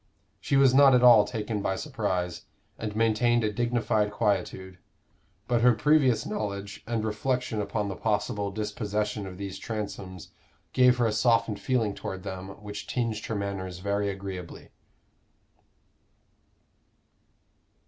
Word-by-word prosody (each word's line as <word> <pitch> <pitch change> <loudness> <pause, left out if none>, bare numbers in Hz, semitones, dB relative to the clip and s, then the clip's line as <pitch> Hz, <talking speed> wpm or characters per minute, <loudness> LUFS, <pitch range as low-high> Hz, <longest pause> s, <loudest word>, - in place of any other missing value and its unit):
She 140 - +1
was 135 -2 +5
not 135 -1 +7
at 125 - +3
all 115 -4 +8
taken 105 -1 -3
by 95 -1 -1
surprise, 95 - -3 0.3
and 105 -2 -5
maintained 115 +1 +2
a 105 -1 0
dignified 120 -2 +1
quietude; 95 -3 -2 0.7
but 120 -2 +2
her 125 0 +6
previous 130 -3 +3
knowledge 100 -1 -4
and 115 -2 -1
reflection 115 0 -1
about 100 0 -2
the 95 - -4
possible 105 -1 -1
dispossession 105 0 -3
of 90 -1 -9
these 100 -1 -6
Transomes 100 -5 -6 0.4
gave 125 -1 +5
her 120 - +2
a 110 - +2
softened 115 -1 +2
feeling 110 -1 0
toward 95 -1 -6
them 95 -1 -6
which 105 0 -7
tinged 115 -4 -2
her 115 - -2
manners 95 -3 -4
very 100 +2 -1
agreeably. 95 -3 -7
105 Hz, 130 wpm, -27 LUFS, 100-120 Hz, 0.7 s, all